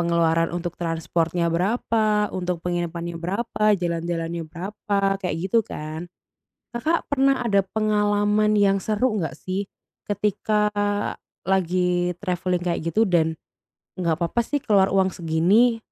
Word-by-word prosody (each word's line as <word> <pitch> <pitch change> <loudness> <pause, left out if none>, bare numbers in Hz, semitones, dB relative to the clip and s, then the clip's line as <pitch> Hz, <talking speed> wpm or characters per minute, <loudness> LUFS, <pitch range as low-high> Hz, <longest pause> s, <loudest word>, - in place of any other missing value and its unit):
pengeluaran 165 -1 +2
untuk 175 -1 -4
transportnya 165 0 0
berapa, 210 +2 +1
untuk 180 -2 -3
penginapannya 170 -1 -3
berapa, 210 +4 -2
jalan-jalannya 170 -1 -2
berapa, 195 +2 -1
kayak 180 -4 -2
gitu 230 +4 +4
kan. 155 +3 -6 0.7
Kakak 315 +8 0
pernah 275 -1 +2
ada 200 -3 +3
pengalaman 210 0 +2
yang 200 -1 +4
seru 215 +2 0
nggak 160 - -3
sih 190 +2 -3 0.4
ketika 210 +1 0 0.8
lagi 180 -1 +1
travelling 180 -2 -1
kayak 175 -1 -1
gitu 220 0 +3
dan 165 -3 +2 0.6
nggak 170 -3 0
papa 175 +7 0
sih 290 +5 -1
keluar 200 -7 +3
uang 190 -1 +2
segini, 185 +9 +3
185 Hz, 120 wpm, -23 LUFS, 170-210 Hz, 0.8 s, gitu